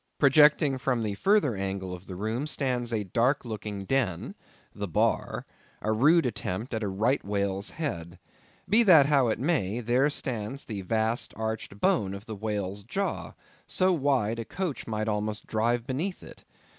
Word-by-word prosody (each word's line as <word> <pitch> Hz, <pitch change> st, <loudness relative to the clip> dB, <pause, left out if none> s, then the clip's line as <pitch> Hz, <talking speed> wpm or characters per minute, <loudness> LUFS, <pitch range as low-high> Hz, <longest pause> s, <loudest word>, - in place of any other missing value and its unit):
Projecting 150 Hz, -1 st, +5 dB
from 125 Hz, -3 st, 0 dB
the 105 Hz, -2 st, -1 dB
further 190 Hz, -, +2 dB
angle 95 Hz, -1 st, -3 dB
of 90 Hz, +1 st, -10 dB
the 95 Hz, -, -6 dB
room 110 Hz, +9 st, -2 dB
stands 125 Hz, -5 st, -1 dB
a 110 Hz, -2 st, 0 dB
dark 120 Hz, +8 st, +1 dB
looking 105 Hz, -3 st, -5 dB
den—the 105 Hz, -3 st, -3 dB
bar—a 105 Hz, +4 st, -2 dB
rude 150 Hz, +9 st, +4 dB
attempt 115 Hz, 0 st, -3 dB
at 110 Hz, -, -1 dB
a 105 Hz, -, -1 dB
right 110 Hz, +8 st, +1 dB
whale's 100 Hz, 0 st, -2 dB
head. 90 Hz, -, -4 dB, 0.5 s
Be 215 Hz, +4 st, +5 dB
that 170 Hz, -10 st, +7 dB
how 140 Hz, -3 st, +3 dB
it 110 Hz, -, 0 dB
may, 120 Hz, -, 0 dB
there 125 Hz, +5 st, +2 dB
stands 130 Hz, -2 st, -4 dB
the 105 Hz, -4 st, -5 dB
vast 110 Hz, +4 st, -1 dB
arched 110 Hz, -2 st, -4 dB
bone 100 Hz, -2 st, +1 dB
of 100 Hz, +2 st, -9 dB
the 110 Hz, -, -6 dB
whale's 100 Hz, -1 st, -3 dB
jaw, 195 Hz, -, -3 dB, 0.3 s
so 185 Hz, 0 st, +2 dB
wide, 130 Hz, -8 st, +1 dB
a 115 Hz, -, -4 dB
coach 180 Hz, -, -4 dB
might 110 Hz, -1 st, -2 dB
almost 105 Hz, 0 st, -2 dB
drive 115 Hz, +2 st, 0 dB
beneath 155 Hz, +9 st, -3 dB
it. -, -, -13 dB
115 Hz, 160 wpm, -28 LUFS, 105-135 Hz, 0.5 s, that